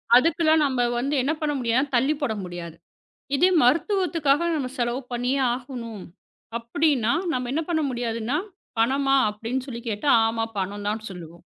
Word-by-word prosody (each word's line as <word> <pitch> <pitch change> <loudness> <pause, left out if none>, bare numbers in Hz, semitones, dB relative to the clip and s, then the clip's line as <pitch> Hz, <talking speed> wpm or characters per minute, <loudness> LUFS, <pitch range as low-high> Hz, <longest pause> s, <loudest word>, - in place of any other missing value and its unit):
அதுக்கெல்லாம் 315 +3 +4
நம்ம 260 -3 -1 0.2
வந்து 275 +5 0
என்ன 285 +5 +1
பண்ண 295 -1 0
முடியா 235 0 +1 0.2
தள்ளிப் 280 +5 +2
போட 245 -6 0
முடியாது. 175 -2 -7 0.6
இதே 360 +7 +4
மருத்துவத்துக்காக 330 - +2
நாம 265 -5 -2
செலவு 240 +2 0
பண்ணியே 250 +3 0
ஆகணும் 240 -5 -6 0.6
அப்பிடின்னா 235 0 +1 0.2
நாம 250 -3 -2
என்ன 320 - 0
பண்ண 325 -2 +1
முடியாதுன்னா 240 +2 -2 0.4
பணமா 270 +4 +2
அப்பிடின்னு 230 +5 -4
சொல்லிக் 235 -1 -6
கேட்டா, 215 +7 0 0.2
ஆமா. 225 0 -1 0.2
பணம் 200 +2 -3
தான் 215 +1 -2
சொல்லுவோம். 170 -2 -10
250 Hz, 145 wpm, -24 LUFS, 225-290 Hz, 0.6 s, அதுக்கெல்லாம்